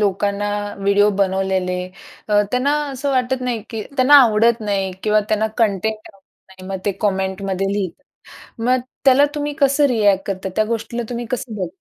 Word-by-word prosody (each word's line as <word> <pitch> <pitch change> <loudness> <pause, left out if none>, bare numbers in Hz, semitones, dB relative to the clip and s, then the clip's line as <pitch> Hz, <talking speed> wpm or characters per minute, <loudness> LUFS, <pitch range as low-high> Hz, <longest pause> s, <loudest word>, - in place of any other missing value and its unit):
लोकांना 205 0 0 0.3
व्हिडिओ 200 +1 +3
बनवलेले, 190 -1 0 0.5
त्यांना 250 +8 +2 0.2
असं 275 +1 -3
वाटत 255 -1 0
नाही, 240 -4 -2
की 225 -2 -4
त्यांना 260 +2 +5
आवडत 230 0 +3
नाही 195 -3 -1
किंवा 215 0 +3
त्यांना 215 0 +1
कंटेंट 220 -1 +1
आवडत 195 -1 -30
नाही. 190 -1 -13
मग 195 - -3
ते 200 - +1
कमेंटमध्ये 195 -1 -1
लिहतात. 200 +6 -4 0.6
मग 255 +2 +2 0.3
त्याला 270 +2 +6
तुम्ही 295 0 -2
कसं 280 +1 +3
रिएक्ट 205 -6 +2
करता 190 -1 -3
त्या 215 - +2
गोष्टीला 230 +1 -3
तुम्ही 240 -1 -4
कसं 250 -3 -4
बघ 185 -4 -3
210 Hz, 160 wpm, -19 LUFS, 195-245 Hz, 0.6 s, त्याला